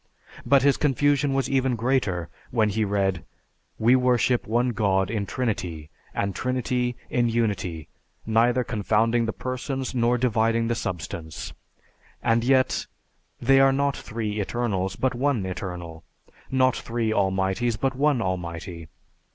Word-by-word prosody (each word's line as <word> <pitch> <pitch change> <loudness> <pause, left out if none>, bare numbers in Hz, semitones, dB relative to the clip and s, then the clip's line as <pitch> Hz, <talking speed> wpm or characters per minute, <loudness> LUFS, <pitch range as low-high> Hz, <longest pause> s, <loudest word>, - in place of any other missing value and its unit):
But 140 -2 +5
his 140 -1 +4
confusion 145 0 +2
was 135 - +1
even 130 -2 +1
greater 110 - 0 0.2
when 110 -3 +2
he 110 +2 0
read, 100 -3 0 0.5
"We 120 +3 +4
worship 125 -1 +2
one 120 +3 +1
God 100 -4 +1
in 105 -3 -2
Trinity, 90 - -3 0.2
and 100 -1 -1
Trinity 125 0 -1 0.2
in 120 -1 +2
Unity, 100 -9 -1 0.4
neither 115 +3 +3
confounding 115 +1 +1
the - - 0
Persons 130 +2 -4
nor 120 0 +2
dividing 115 -1 +1
the - - +2
substance 80 - -5 0.7
and 115 0 +2
yet, 130 +1 +2 0.5
they 135 +2 +4
are 135 0 +6
not 140 0 +1
three 110 -2 -4
Eternals, 100 -4 -1
but 130 +4 0
One 125 -5 0
Eternal, 90 -3 -6 0.5
not 130 -1 +3
three 115 -1 -2
Almighties, 95 +3 0
but 135 -1 0
One 140 -3 +2
Almighty. 85 -2 -4
115 Hz, 135 wpm, -25 LUFS, 95-130 Hz, 0.7 s, are